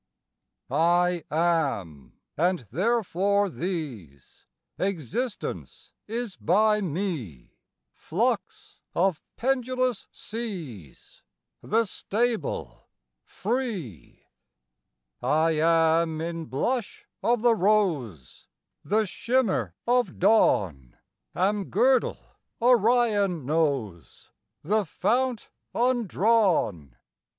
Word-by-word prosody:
I 175 Hz, +1 st, +2 dB
am, 140 Hz, -, -1 dB, 0.2 s
and 175 Hz, -4 st, 0 dB
therefore 200 Hz, -, +1 dB
these, 135 Hz, -, -6 dB, 0.3 s
Existence 200 Hz, -, -4 dB
is 225 Hz, -2 st, -4 dB
by 210 Hz, +4 st, +3 dB
me, 155 Hz, -, -4 dB, 0.3 s
Flux -, -, -2 dB, 0.2 s
of 180 Hz, -2 st, +1 dB, 0.2 s
pendulous 255 Hz, -2 st, 0 dB
seas, 170 Hz, -, -8 dB, 0.4 s
The 225 Hz, +2 st, +1 dB
stable, 220 Hz, -, -2 dB, 0.4 s
free. 195 Hz, -, -4 dB, 1.0 s
I 160 Hz, +2 st, +2 dB
am 160 Hz, 0 st, +2 dB
in 165 Hz, 0 st, -4 dB
blush 230 Hz, -, -2 dB, 0.2 s
of 240 Hz, -1 st, +1 dB
the 240 Hz, -1 st, +5 dB
rose, 170 Hz, -, 0 dB, 0.4 s
The 215 Hz, +2 st, +1 dB
shimmer 195 Hz, -, 0 dB
of 245 Hz, -6 st, +1 dB
dawn; 95 Hz, -, +2 dB, 0.4 s
Am 200 Hz, +2 st, +1 dB
girdle 250 Hz, +7 st, +2 dB, 0.4 s
Orion 225 Hz, -, +3 dB
knows, 135 Hz, -, -2 dB, 0.3 s
The 210 Hz, +7 st, +1 dB
fount 235 Hz, -, -1 dB, 0.2 s
undrawn. 210 Hz, -, +1 dB
185 Hz, 75 wpm, -26 LUFS, 155-225 Hz, 1.0 s, the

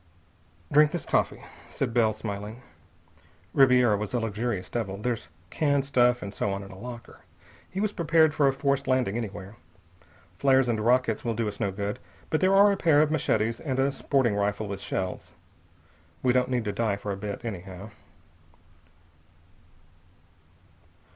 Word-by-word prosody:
"Drink 150 Hz, +1 st, +6 dB
this 175 Hz, -, -4 dB
coffee," -, -, 0 dB, 0.3 s
said 125 Hz, -4 st, -2 dB
Bell, 115 Hz, -2 st, +3 dB
smiling. 105 Hz, +3 st, -6 dB, 0.9 s
"Ribiera 125 Hz, -5 st, +5 dB
was 105 Hz, +3 st, -4 dB
a -, -, +2 dB
luxurious 110 Hz, -3 st, -2 dB
devil. 100 Hz, -5 st, -3 dB
There's 110 Hz, -7 st, -3 dB, 0.2 s
canned 140 Hz, -3 st, +1 dB
stuff 125 Hz, -3 st, +2 dB
and 100 Hz, 0 st, -6 dB
so 100 Hz, -, -1 dB
on 100 Hz, 0 st, -3 dB
in 100 Hz, -, -11 dB
a 95 Hz, -, -11 dB
locker. 120 Hz, 0 st, -9 dB, 0.5 s
He 190 Hz, -, -5 dB
was 210 Hz, 0 st, 0 dB
prepared 160 Hz, -2 st, +3 dB
for 145 Hz, -1 st, +3 dB
a -, -, +4 dB
forced 140 Hz, 0 st, -1 dB
landing 130 Hz, -6 st, +1 dB
anywhere. 100 Hz, -3 st, -6 dB, 0.8 s
Flares 135 Hz, -2 st, +4 dB
and 115 Hz, -2 st, 0 dB
rockets 120 Hz, -1 st, +2 dB
will 115 Hz, -2 st, -1 dB
do 115 Hz, -1 st, -1 dB
us 105 Hz, -1 st, -6 dB
no 105 Hz, -4 st, 0 dB
good, 100 Hz, +2 st, -4 dB, 0.3 s
but 155 Hz, -, +1 dB
there 190 Hz, +1 st, +4 dB
are 200 Hz, +1 st, +7 dB
a 200 Hz, -, 0 dB
pair 155 Hz, -5 st, +4 dB
of 155 Hz, -, -1 dB
machetes 115 Hz, -6 st, 0 dB
and 135 Hz, -5 st, -3 dB
a 135 Hz, +1 st, +2 dB
sporting 135 Hz, -4 st, +1 dB
rifle 105 Hz, +1 st, -1 dB
with 100 Hz, -1 st, -5 dB
shells. 95 Hz, -1 st, -4 dB, 0.9 s
We 125 Hz, -1 st, +3 dB
don't 125 Hz, 0 st, +2 dB
need 125 Hz, -3 st, -1 dB
to 105 Hz, -, -1 dB
die 105 Hz, 0 st, 0 dB
for 100 Hz, 0 st, -5 dB
a -, -, -2 dB
bit, 100 Hz, +3 st, -6 dB
anyhow." 100 Hz, -1 st, -7 dB
120 Hz, 165 wpm, -27 LUFS, 105-135 Hz, 0.9 s, are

